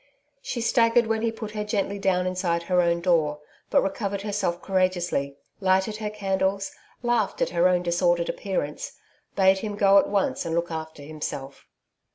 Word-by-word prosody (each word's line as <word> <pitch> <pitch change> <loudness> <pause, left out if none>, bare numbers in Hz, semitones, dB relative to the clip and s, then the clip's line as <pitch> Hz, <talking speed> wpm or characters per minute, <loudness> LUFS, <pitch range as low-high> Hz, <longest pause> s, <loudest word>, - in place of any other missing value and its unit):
She 255 - -4
staggered 230 0 +3
when 220 0 0
he 230 0 +1
put 220 -1 -7
her 210 -1 -3
gently 200 -1 -2
down 185 -2 +1
inside 180 -2 -1
her 180 +1 +2
own 170 0 +1
door, 160 -4 +2 0.3
but - - +4
recovered 195 0 -2
herself 200 -4 -1
courageously, 175 -7 0 0.2
lighted 190 +2 +1
her 215 -1 -3
candles, 195 -1 -1 0.3
laughed 240 -4 +1
at - - 0
her 175 +1 +3
own 180 -1 +2
disordered 175 0 +1
appearance, 180 -7 -3 0.4
bade 190 0 +4
him 210 0 -4
go 200 -1 +6
at - - 0
once 200 -1 0
and 165 0 -2
look 170 0 -1
after 160 -2 -6
himself. 145 -2 -6
190 Hz, 170 wpm, -25 LUFS, 170-205 Hz, 0.4 s, go